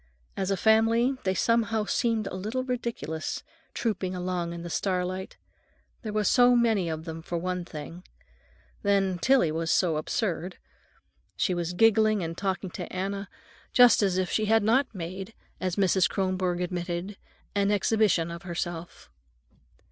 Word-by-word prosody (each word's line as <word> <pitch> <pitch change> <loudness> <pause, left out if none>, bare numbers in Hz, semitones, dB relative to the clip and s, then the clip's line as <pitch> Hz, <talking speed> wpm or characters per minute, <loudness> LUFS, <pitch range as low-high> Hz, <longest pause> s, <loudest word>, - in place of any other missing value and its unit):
As 190 -1 -2
a 195 - +1
family, 225 +5 +3
they 190 0 +1
somehow 225 0 +1
seemed 230 -2 0
a 195 - -5
little 215 +7 -3
ridiculous, 235 -11 -4 0.3
trooping 195 -5 -2
along 180 -1 -2
in 170 0 -6
the 175 - -6
starlight. 185 0 -2 0.6
There 220 - -5
were 210 0 0
so 245 +3 +5
many 220 -7 +2
of 160 0 -4
them, 165 -1 -6
for 170 +1 -4
one 180 +1 -3
thing. 165 +2 -8 0.8
Then 195 -3 +1
Tillie 255 -6 +3
was 165 +1 -2
so 170 -4 +2
absurd. 180 +1 -2 0.8
She 185 - +1
was 175 0 -2
giggling 215 0 +4
and 165 0 -4
talking 190 -1 -2
to - - -7
Anna 195 +1 -3 0.4
just 245 -3 +7
as 190 -3 +1
if 185 -1 -1
she 215 - +1
had 220 0 +3
not 255 +6 +3
made, 190 +3 -7 0.2
as 185 -2 -2
even 200 - +2
Mrs. 185 0 +3
Kronborg 185 -2 -1
admitted, 175 +2 -3 0.4
an 200 0 +1
exhibition 205 -4 +2
of 170 +1 -7
herself. 175 -1 -5
190 Hz, 155 wpm, -27 LUFS, 175-220 Hz, 0.8 s, just